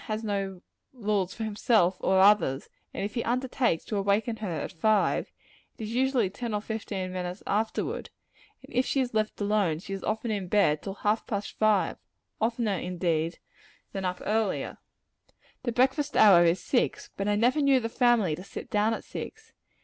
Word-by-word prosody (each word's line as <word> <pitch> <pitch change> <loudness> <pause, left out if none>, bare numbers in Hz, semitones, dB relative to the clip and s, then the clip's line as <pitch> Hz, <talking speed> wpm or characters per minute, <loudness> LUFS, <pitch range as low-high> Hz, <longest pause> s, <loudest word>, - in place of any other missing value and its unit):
has 215 +1 -3
no 195 -3 -3 0.3
roles 205 -6 -1
for 225 - -6
himself 210 -3 +2
or 190 0 +2
others; 195 -9 +4 0.2
and - - -4
if 205 - -5
he 235 - -1
undertakes 250 -6 0
to 215 - -4
awaken 205 +4 +1
her 215 -3 -4
at 165 - -3
five, 210 +4 +1 0.5
it - - -7
is 215 +1 -5
usually 255 -3 +2
ten 215 +3 -4
or - - 0
fifteen 205 -4 -4
minutes 180 +1 -5
afterward; 220 +2 -1 0.5
and - - -14
if 255 - +4
she 275 - 0
is 250 -2 -1
let 215 0 -1
alone, 205 -6 +1
she 190 +4 -7
is 195 - -5
often 220 +1 -2
in 200 -3 -2
bed 175 -6 +3
till 195 -1 -6
half 210 +2 0
past 205 -2 -4
five 215 -3 +2 0.4
oftener, 225 -4 0
indeed, 170 -2 -1 0.5
than 195 -1 -4
up 180 0 -2
earlier. 215 -2 -1 0.8
The 240 - -2
breakfast 265 +4 +1
hour 185 -5 +8
is 170 +2 +3
six; 245 +6 -1
but 195 - -2
I 205 - +2
never 245 +8 +2
knew 275 -2 +4
the 230 - -2
family 230 - +2
to 180 - -9
sit 195 - -9
down 215 +2 +2
at - - -8
six. 445 +1 -8
210 Hz, 180 wpm, -28 LUFS, 190-230 Hz, 0.8 s, hour